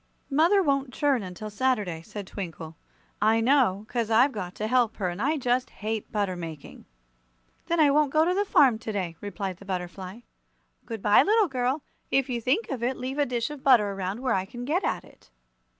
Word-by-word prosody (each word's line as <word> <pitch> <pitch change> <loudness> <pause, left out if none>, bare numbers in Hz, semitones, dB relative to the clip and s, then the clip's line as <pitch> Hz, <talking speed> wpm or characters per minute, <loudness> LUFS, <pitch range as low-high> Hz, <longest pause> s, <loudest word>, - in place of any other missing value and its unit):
"Mother 335 +8 +4
won't 275 -4 0
churn 280 -5 +2
until 195 +3 -7
Saturday," 210 -8 0
said 205 +3 -8
Twinkle. 165 -4 -7 0.5
"I 220 +2 +4
know, 225 -5 +2
'cause 235 -2 -2
I've 245 +5 +5
got 185 -6 -6
to 215 - -3
help 240 0 +2
her, 185 -4 -1
and 175 +3 -5
I 300 +5 +1
just 250 -1 0
hate 220 0 -5
butter 200 -3 -1
making!" 165 -4 -9 0.8
"Then 340 0 0
I 295 -2 +6
won't 295 -1 +3
go 310 +2 +4
to 355 - +2
the 400 +2 +1
farm 270 - +4
to 220 - -5
day," 185 -5 -3
replied 195 -2 -4
the 200 - -14
butterfly. 185 +2 -5 0.7
"Good 225 -3 -6
bye, 210 0 +6
little 430 0 +3
girl. 260 +1 -1 0.3
If 270 -1 +1
you 240 -1 -2
think 280 - 0
of 260 -4 -3
it, 250 +2 -1
leave 265 +3 -4
a 290 - +2
dish 245 +2 -2
of 295 -2 -8
butter 235 -7 +5
around 195 +3 -4
where 255 -3 +1
I 190 -1 0
can 240 +4 -8
get 340 +8 0
at - - -1
it." - - -21
230 Hz, 205 wpm, -26 LUFS, 200-275 Hz, 0.8 s, I